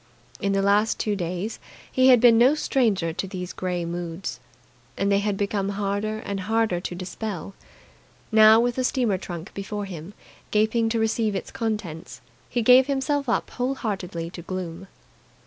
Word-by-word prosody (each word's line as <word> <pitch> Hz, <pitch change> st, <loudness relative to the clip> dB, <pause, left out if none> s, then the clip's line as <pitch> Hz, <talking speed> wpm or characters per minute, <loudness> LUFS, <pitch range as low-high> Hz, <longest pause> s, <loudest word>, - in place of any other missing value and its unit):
In 200 Hz, 0 st, 0 dB
the 195 Hz, 0 st, +1 dB
last 205 Hz, +2 st, +3 dB
two 210 Hz, -1 st, 0 dB
days 180 Hz, +4 st, -4 dB, 0.3 s
he 255 Hz, 0 st, +4 dB
had 250 Hz, -2 st, +7 dB
been 235 Hz, -1 st, +7 dB
no 260 Hz, +5 st, +6 dB
stranger 215 Hz, -, +1 dB
to 195 Hz, -, -3 dB
these 185 Hz, -2 st, -6 dB
grey 180 Hz, -2 st, -2 dB
moods, 170 Hz, -3 st, -5 dB, 0.6 s
and 200 Hz, +1 st, +1 dB
they 200 Hz, -, +4 dB
had 205 Hz, -1 st, -1 dB
become 200 Hz, -1 st, -1 dB
harder 205 Hz, +2 st, -1 dB
and 200 Hz, -1 st, -3 dB
harder 220 Hz, -2 st, +1 dB
to 175 Hz, -, -5 dB
dispel. 190 Hz, +1 st, -5 dB, 0.8 s
Now, 220 Hz, 0 st, +7 dB
with 240 Hz, +1 st, 0 dB
the 255 Hz, -, +1 dB
steamer 240 Hz, -7 st, +1 dB
trunk 175 Hz, 0 st, -7 dB
before 205 Hz, +1 st, -4 dB
him 185 Hz, +1 st, -9 dB, 0.3 s
gaping 220 Hz, +2 st, +2 dB
to 225 Hz, 0 st, 0 dB
receive 220 Hz, -1 st, 0 dB
its 190 Hz, -, -4 dB
contents, 205 Hz, -, -4 dB, 0.3 s
he 240 Hz, -, 0 dB
gave 250 Hz, +3 st, +7 dB
himself 280 Hz, 0 st, 0 dB
up -, -, 0 dB
whole 255 Hz, +2 st, -1 dB
heartedly 180 Hz, -8 st, -4 dB
to 175 Hz, -, -8 dB
gloom. 185 Hz, 0 st, -6 dB
205 Hz, 165 wpm, -24 LUFS, 185-225 Hz, 0.8 s, had